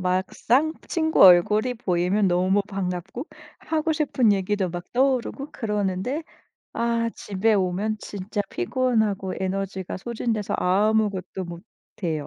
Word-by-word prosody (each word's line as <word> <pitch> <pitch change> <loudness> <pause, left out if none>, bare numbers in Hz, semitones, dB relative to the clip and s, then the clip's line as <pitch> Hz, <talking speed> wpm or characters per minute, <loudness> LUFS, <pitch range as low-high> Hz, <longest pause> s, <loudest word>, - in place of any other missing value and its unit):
막상 190 +11 +1 0.2
친구 315 -1 +2
얼굴이 210 +7 +6
보이면 190 -2 +1
너무 185 +3 +2
반갑고 195 - -4 0.3
하고 320 0 0
싶은 270 -8 +2
얘기도 195 0 0
막 175 +1 -7
떠오르고 265 +2 0
그러는데 210 - -2 0.5
아 235 0 0
집에 210 +2 0
오면 195 +3 0
진짜 205 +1 -5
피곤하고 210 - 0
에너지가 190 -1 -3
소진돼서 225 0 -2
아무것도 200 -1 +1
못 170 0 -8 0.4
해요. 155 -4 -1
205 Hz, 280 characters per minute, -24 LUFS, 185-235 Hz, 0.5 s, 얼굴이